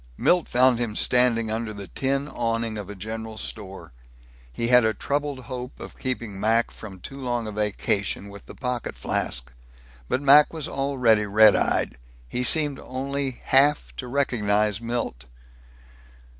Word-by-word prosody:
Milt 180 -1 +3
found 125 -1 +4
him 115 -3 -2
standing 120 -3 +2
under 110 0 -3
the 100 -2 -8
tin 135 +1 -1
awning 115 -4 -2
of 100 - -7
the 105 - -8
general 110 +2 -6
store. 100 -3 -7 0.6
He 115 - -2
had 125 -1 +7
a 110 0 +1
troubled 145 -1 -2
hope 125 +1 -7
of - - -9
keeping 120 -6 -4
Mac 115 +3 +2
from 95 -4 -10
too 135 +8 -9
long 120 -2 -2
a 110 - -5
vacation 100 -1 -2
with 100 0 -12
the - - -11
pocket 125 -2 -3
flask. - - -3 0.6
But - - +1
Mac 145 +3 +7
was 160 -3 -4
already 125 -6 +1
red 105 +1 +6
eyed. - - 0 0.3
He 125 - -3
seemed 145 +1 +3
only 135 0 -4
half 145 +2 +3
to 125 - -5
recognize 105 -6 +1
Milt. 115 - -3
115 Hz, 155 wpm, -24 LUFS, 105-130 Hz, 0.6 s, had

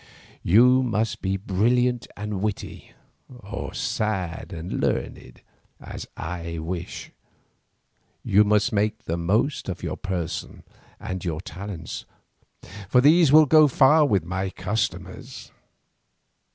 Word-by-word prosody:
You 125 +8 +5
must 110 -2 -1
be 95 0 -1
brilliant 120 +6 +1
and 105 -2 -4
witty, 105 -1 -5 0.4
or 105 -5 -7
sad 95 -5 -2
and 85 0 -5
learned, - - -3 0.4
as - - -8
I 85 0 -5
wish; 85 +2 -6 1.1
you 105 +2 +4
must 105 +1 +2
make 105 +1 0
the 85 - -2
most 100 - 0
of 90 - -6
your - - -3
person 90 -3 -5 0.4
and 95 -1 -5
your 80 -3 -3
talents, 90 0 -7 0.8
for 125 - +5
these 155 +4 +6
go 155 +1 +7
far 145 +3 +5
with 100 - +1
my 95 +2 -2
customers. 105 +3 -4
100 Hz, 110 wpm, -24 LUFS, 90-120 Hz, 1.1 s, go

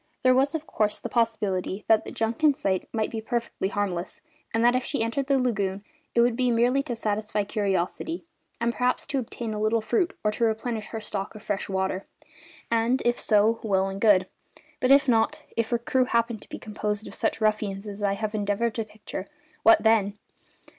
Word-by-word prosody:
There 255 0 +6
was, 275 +4 +2
of 315 -1 -3
course, 210 -7 0
the 240 - -6
possibility 210 -5 0
that 220 -1 +4
the - - -6
junk 225 +5 -2
in 295 -3 +6
sight 190 -6 -1
might 220 -2 -1
be 225 - -3
perfectly 235 -4 -2
harmless, 200 - -3 0.3
and 225 +1 +2
that 245 +1 +5
if 255 - +1
she 245 -2 -1
entered 265 +4 -1
the 275 -2 +3
lagoon 205 -6 -1 0.3
it 235 - +5
would 240 0 +3
be 250 0 +1
merely 245 +3 +3
to 275 -4 -4
satisfy 210 -1 -1
curiosity 200 - -2 0.3
and 235 +1 +1
perhaps 250 +1 0
to 275 -2 -1
obtain 230 -2 -5
a 210 - -3
little 220 +2 +2
fruit 345 - 0
or 210 - +2
to 235 - -2
replenish 225 0 -1
her 225 - -5
stock 210 -1 -4
of 215 - -10
fresh 205 -1 -2
water; 190 0 -1 0.6
and, 230 +3 +2
if 240 0 +2
so, 215 +1 +3
well 195 -3 +1
and 195 +1 -6
good. 200 -4 +5 0.5
But 255 - +1
if 275 +1 +6
not 225 -3 +2
if 230 -1 0
her 240 - +2
crew 255 +2 +1
happened 235 -3 0
to - - -13
be - - -6
composed 210 0 -3
of - - -9
such 225 - -1
ruffians 215 -2 0
as 205 0 -7
I 200 -1 +2
have 215 +1 -3
endeavoured 210 +2 0
to 225 - -2
picture, 210 -2 -7 0.3
what 225 -1 +6
then? 210 -2 +3
220 Hz, 205 wpm, -26 LUFS, 205-240 Hz, 0.6 s, There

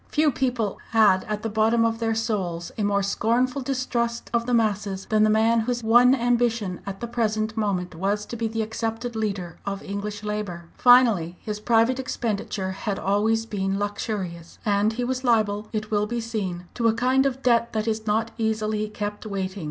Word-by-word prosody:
Few 305 -1 +3
people 245 -5 -1
had 210 -4 +5
at 210 0 -4
the - - 0
bottom 220 +2 +3
of 225 0 0
their 225 -1 0
souls 190 -7 -2
a - - -4
more 200 -1 +1
scornful 245 +7 +1
distrust 250 -3 -2
of 235 0 +1
the 250 - 0
"masses" 205 -3 0
than 215 -1 +2
the 215 - +5
man 225 +2 +3
whose 240 +1 -1
one 240 +3 +6
ambition 235 -6 0
at 195 0 -6
the 235 - -3
present 220 -2 -1
moment 195 -5 -1
was 200 +5 -1
to - - -7
be 230 -1 -1
the 225 0 -2
accepted 225 +2 -4
leader 195 -6 -3
of 200 0 -4
English 205 +1 -5
labour. 205 -5 -4
Finally, 225 -9 +5
his 210 -1 -5
private 230 +3 +2
expenditure 210 -6 -2
had 195 +1 -3
always 220 +3 +1
been 195 -3 -2
luxurious; 200 -4 -4
and 205 +1 +2
he 245 +2 -2
was 255 +1 -2
liable, 215 -3 +2
it 215 -1 -4
will 210 0 +1
be 240 +2 -2
seen, 200 -6 -4
to 235 -1 +1
a 225 - +3
kind 260 +3 +3
of 265 -1 -4
debt 235 -1 +3
that 215 0 -1
is 220 0 -2
not 220 +2 +1
easily 215 -1 0
kept 210 0 -5
waiting. 195 -1 -3
220 Hz, 190 wpm, -24 LUFS, 205-235 Hz, -, one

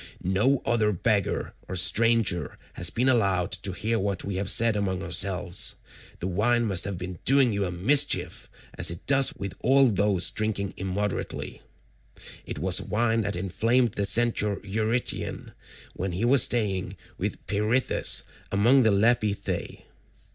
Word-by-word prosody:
No 105 +9 +1
other 110 -3 +1
beggar 100 +1 -1
or 95 - -5
stranger 105 -3 +2 0.2
has 90 - +1
been 125 +5 -1
allowed 100 -7 +1
to 100 - -2
hear 110 +5 -2
what 100 0 -2
we 95 -1 -3
say 115 +5 +3
among 100 -3 -2
ourselves; 90 +1 +1 0.4
the - - -5
wine 115 +6 +1
must 95 -5 +1
have 100 -2 -4
been 90 -1 -7
doing 135 -3 +4
you 100 -1 -1
a 90 - -4
mischief, 110 +12 +2 0.3
as - - 0
it 85 0 -7
does 135 -1 +4
with 100 -1 -6
all 135 0 +4
those 100 -3 +2
who - - -20
drink 110 -1 +1 0.2
immoderately. 95 +2 -4 0.9
It - - -6
was - - +1
wine 115 +1 0
that 100 -2 -3
inflamed 115 +6 0
the 100 0 -2
Centaur 105 -1 +2
Eurytion 110 +4 -3 0.4
when 95 0 -4
he 95 +7 -1
was 130 +1 +5
staying 105 -7 0 0.2
with - - -5
Peirithous 105 +6 0 0.3
among 120 +7 +4
the 110 - +3
Lapithae. 105 0 -1
105 Hz, 145 wpm, -25 LUFS, 95-115 Hz, 0.9 s, was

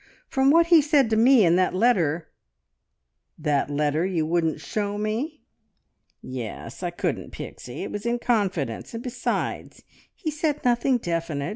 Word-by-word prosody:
From 265 0 +2
what 335 +3 +6
he 335 -2 +6
said 280 -5 +3
to - - +3
me 235 -1 +6
in 170 +1 +4
that 185 0 +1
letter 175 -8 +1 0.5
" - - -54
"That 145 -1 +1
letter 150 +2 0
you 180 -4 0
wouldn't 165 -1 0
show 205 -1 -3
me?" 230 +9 -3 0.8
"Yes. 120 - -7
I 175 - -1
couldn't, 175 - -3
Pixie! - - -8
It - - -5
was 205 +3 -4
in 240 0 +1
confidence, 195 - -1
and 230 - -5
besides, 250 -1 -3 0.3
he 320 -5 -3
said 305 -2 -2
nothing 245 +1 +3
definite. 165 -7 -3
205 Hz, 155 wpm, -25 LUFS, 160-250 Hz, 0.8 s, what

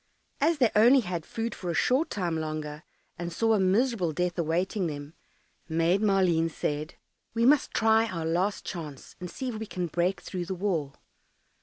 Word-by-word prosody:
As 320 +3 +3
they 245 -6 +3
only 240 +5 +7
had 175 -6 -4
food 225 0 -3
for 180 - -6
a 170 - -1
short 275 - +2
time 175 -5 -2
longer, 155 -1 -4 0.4
and 175 0 -4
saw 225 +6 +2
a 215 - +3
miserable 195 -1 +2
death 180 +2 -1
awaiting 175 +4 0
them, 145 0 -6 0.6
Maid 165 +4 +2
Maleen 185 -5 +3
said, 150 0 -3 0.4
"We 230 +1 +2
must 285 +2 +4
try 225 0 +3
our 165 -4 -4
last 180 +5 0
chance, 150 -6 -7
and 180 0 -6
see 260 +9 -4
if 220 -3 -5
we 220 - -5
can 180 -3 -3
break 175 +3 0
through 180 -2 -5
the 190 +2 -4
wall." 170 -7 -2
180 Hz, 180 wpm, -28 LUFS, 165-220 Hz, 0.6 s, only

